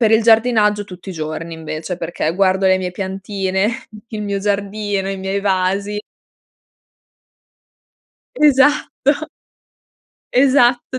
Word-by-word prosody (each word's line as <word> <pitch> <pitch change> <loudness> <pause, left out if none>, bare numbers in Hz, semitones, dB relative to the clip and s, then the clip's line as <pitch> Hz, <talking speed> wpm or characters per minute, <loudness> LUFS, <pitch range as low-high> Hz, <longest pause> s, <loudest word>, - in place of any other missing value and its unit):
per 220 -2 +3
il 220 +1 +5
giardinaggio 220 -2 +3
tutti 185 -1 -10
i - - -5
giorni 155 0 -5
invece, 160 +2 -5
perché 165 -1 -2
guardo 190 0 +2
le 185 0 +4
mie 180 -1 -3
piantine, 190 +1 -2 0.4
il 215 -3 -5
mio 200 -1 -2
giardino, 200 0 -2
i 195 - -4
miei 190 +1 -2
vasi. 200 +1 0 2.4
Esatto. 290 - +3 1.2
Esatto, 255 -1 +3
200 Hz, 110 wpm, -18 LUFS, 185-220 Hz, 2.4 s, il